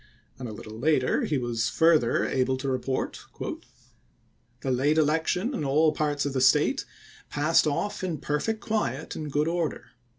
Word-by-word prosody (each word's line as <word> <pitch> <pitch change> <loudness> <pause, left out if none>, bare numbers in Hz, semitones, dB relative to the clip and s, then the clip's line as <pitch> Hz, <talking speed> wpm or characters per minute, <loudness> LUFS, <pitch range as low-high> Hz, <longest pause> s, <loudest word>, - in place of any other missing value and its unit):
And 125 -3 -5
a - - -6
little 110 +1 -9
later 145 -1 +2
he 150 - 0
was 120 -3 -1
further 160 -7 +3
able 130 0 0
to 135 +1 -4
report: 130 0 -2 0.7
" - - -39
The 135 - -1
late 140 +5 +2
election 160 - +1
in 160 - -2
all 150 +3 +3
parts 145 -2 -1
of 140 - -2
the 130 - 0
State - - +3 0.4
passed 150 +3 +3
to - - +2
'^Li'ncoin, 145 - 0
off 205 -2 -3
in 175 -4 -2
perfect 150 +11 -2
quiet 160 - -2
and 150 -2 -5
good 150 +2 +1
order. 165 -8 -2
145 Hz, 175 wpm, -27 LUFS, 130-160 Hz, 0.7 s, further